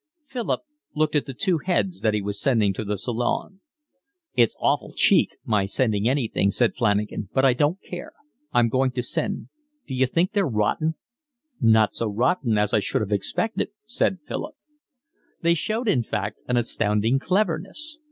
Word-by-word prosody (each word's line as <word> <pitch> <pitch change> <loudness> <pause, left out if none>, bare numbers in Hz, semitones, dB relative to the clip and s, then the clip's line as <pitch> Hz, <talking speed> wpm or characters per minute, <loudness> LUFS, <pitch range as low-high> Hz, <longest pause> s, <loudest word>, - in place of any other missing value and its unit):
Philip 255 -4 -2 0.3
looked 155 0 +1
at 150 - +1
the 135 - -5
two 170 +5 +1
heads 180 +2 -1
that 110 -1 +2
he 105 - -1
was 100 0 -4
sending 110 -7 +2
to 110 - -4
the 105 0 -2
Salon. 120 - -2 0.7
"It's 120 -2 +3
awful - - 0
cheek - - +3
my 105 -3 +2
sending 110 +1 +1
anything," 120 -7 +1
said 115 0 +2
Flanagan, 105 -3 0
"but 135 0 +4
I 130 - +5
don't 145 +7 +1
care, 175 -1 -8 0.4
I'm 120 -1 +4
going 130 +3 +2
to 125 -1 -2
send. 200 +10 -3 0.4
D'you 130 -1 +1
think 170 +8 +1
they're 200 -4 +1
rotten?" 130 +8 0 0.6
"Not 110 -2 +4
so 115 - -1
rotten 115 - +1
as 105 0 +1
I - - +5
should 105 - -1
have 105 -1 -3
expected," 210 - -1 0.2
said 225 -4 0
Philip. 310 - -5 0.9
They 170 0 +5
showed 220 +8 -2
in 135 - +3
fact 105 -2 -3
an 125 - +1
astounding 115 +1 +1
cleverness. 195 - -1
125 Hz, 165 wpm, -24 LUFS, 105-175 Hz, 0.9 s, I